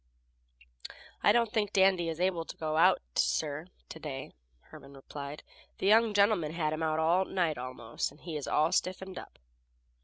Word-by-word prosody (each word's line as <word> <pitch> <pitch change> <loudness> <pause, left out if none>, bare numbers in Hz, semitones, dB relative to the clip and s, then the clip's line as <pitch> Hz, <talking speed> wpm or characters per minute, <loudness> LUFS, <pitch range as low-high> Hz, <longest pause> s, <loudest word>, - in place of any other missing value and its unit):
"I - - +5
don't 235 -1 +2
think 210 -3 0
Dandy 190 -3 +3
is 165 0 -5
able 180 -2 +1
to - - -9
go 155 -1 -2
out, 160 - +4
sir, 155 +2 0 0.2
to 160 - -9
day," 135 -4 -6 0.4
Herman 140 0 -13
replied. 140 +2 -8 0.3
"The - - -4
young 220 +1 +4
gentlemen 200 -7 +3
had 155 -2 -1
him 155 - -4
out 155 -1 0
all 170 +4 +3
night 170 -8 -1
almost, 125 -2 -4
and 145 - -19
he 165 -3 -7
is 150 - -4
all 155 +2 +2
stiffened 185 0 -2
up." - - -13
165 Hz, 175 wpm, -30 LUFS, 150-190 Hz, 0.4 s, I